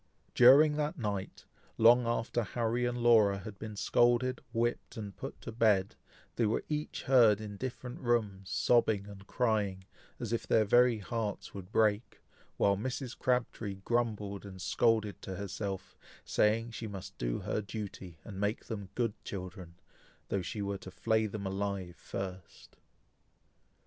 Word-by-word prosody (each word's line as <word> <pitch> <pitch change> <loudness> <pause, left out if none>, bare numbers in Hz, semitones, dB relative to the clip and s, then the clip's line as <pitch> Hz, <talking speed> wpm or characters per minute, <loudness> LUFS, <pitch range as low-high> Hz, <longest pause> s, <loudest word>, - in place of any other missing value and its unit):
During 145 +5 +7
that 150 +3 -1
night, 100 -6 -4 0.3
long 120 +1 +6
after 120 0 0
Harry 120 +2 -1
and 120 0 -2
Laura 115 -5 +5
had 95 +1 -9
been 110 -1 -6
scolded, 120 +4 +2
whipped, 120 0 -1
and 105 -3 -6
put - - -7
to - - -6
bed, 105 -4 +2 0.4
they 115 - +3
were 110 - 0
each 150 0 -3
heard 115 -6 +5
in 105 -1 -7
different 125 +2 -6
rooms, 105 -6 0
sobbing 105 0 +2
and 100 -1 -12
crying, 105 -6 0 0.3
as 120 -2 -3
if 115 - -2
their 110 - +4
very 120 +2 +5
hearts 105 0 -4
would 95 -1 -9
break, 110 0 +1 0.4
while 100 0 +3
Mrs. 125 +4 -4
Crabtree 120 -5 -1
grumbled 105 -1 -2
and 95 -2 -10
scolded 110 +1 +1
to 95 - -6
herself, 95 0 -5 0.3
saying 115 +2 +2
she 115 0 -5
must 100 -3 -8
do - - -1
her - - -1
duty, 100 -5 -7
and 100 -3 -8
make 105 +3 -1
them 100 -4 -6
good 115 -4 0
children, 90 -3 -7 0.5
though 100 - 0
she 100 +3 -4
were 100 0 -3
to - - -9
flay 110 +3 +1
them 100 -1 -5
alive 95 -2 -3
first. 95 -1 -7
105 Hz, 150 wpm, -32 LUFS, 100-120 Hz, 0.5 s, During